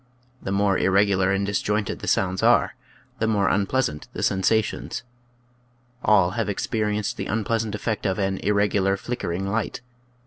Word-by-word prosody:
The - - -4
more 100 0 +2
irregular 95 -1 +3
and 100 0 +1
disjointed 105 +1 -1
the - - -7
sounds 95 -1 +1
are, - - +4 0.5
the 110 - +1
more 105 -3 +2
unpleasant 100 - 0
the - - -4
sen 95 - +1
sations. 110 +3 0 1.0
All 95 -4 +4
have 110 +1 -2
experienced 105 0 -1
the - - -4
unpleasant 110 0 -1
effect 105 0 -2
of 95 - -1
an 95 -1 -1
irregular, 100 -1 +1
flickering 95 -5 -3
light. 110 +3 -2
100 Hz, 145 wpm, -24 LUFS, 95-105 Hz, 1.0 s, are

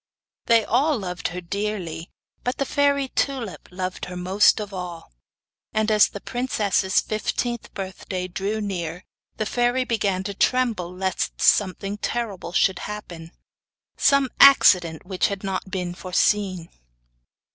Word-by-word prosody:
They 230 -2 +4
all 280 +5 +2
loved 180 -4 -4
her 180 +1 -6
dearly, 180 -3 -4 0.3
but 250 +2 -2
the 275 - 0
fairy 280 -1 +1
Tulip 255 -9 -3
loved 185 0 -4
her 180 - -8
most 190 +5 +4
of 205 -2 -6
all; 180 -3 -7 0.6
and 215 0 +1
as 210 -1 +6
the 200 - -7
princess's 205 -6 0
fifteenth 235 +2 -3
birthday 185 -1 -5
drew 200 +4 -3
near, 180 -4 -4 0.3
the 215 - -1
fairy 245 +3 +1
began 205 -6 -1
to 200 +1 -4
tremble 225 -6 +1
lest 190 +1 -2
something 200 +1 +2
terrible 210 -8 -3
should 185 +2 +2
happen 175 -6 -8 0.6
some 280 -1 +3
accident 180 - +6
which 185 -1 0
had 200 0 -5
not 190 0 -3
been 180 -2 -3
foreseen. 185 0 0
200 Hz, 135 wpm, -23 LUFS, 180-230 Hz, 0.6 s, as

